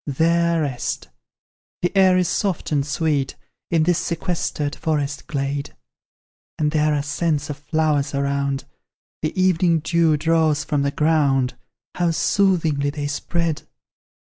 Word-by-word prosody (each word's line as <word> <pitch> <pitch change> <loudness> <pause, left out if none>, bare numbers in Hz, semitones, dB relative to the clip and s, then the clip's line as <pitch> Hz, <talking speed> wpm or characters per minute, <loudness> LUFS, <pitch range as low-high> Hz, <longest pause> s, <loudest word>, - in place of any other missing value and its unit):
There 170 +3 +2
rest. 125 - -3 0.7
The 175 - 0
air 190 -1 +5
is 180 -1 +2
soft 190 -4 -1
and 145 -2 +2
sweet 145 -1 -1 0.3
In 165 -2 +3
this 175 0 +2
sequestered 165 -4 -2
forest 145 -3 -2
glade, 140 -1 -3 0.8
And 150 -1 +1
there 155 -1 +2
are 145 - -1
scents 145 0 -1
of 140 - -6
flowers 150 -2 0
around, 140 0 -1 0.6
The 155 +4 -2
evening 180 -2 +3
dew 165 -1 +2
draws 160 -1 +2
from 145 -1 0
the 140 - +1
ground; 140 -4 +2 0.4
How 175 -1 +1
soothingly 165 -5 +2
they 145 0 -4
spread! 160 +2 -1
155 Hz, 130 wpm, -22 LUFS, 145-170 Hz, 0.8 s, air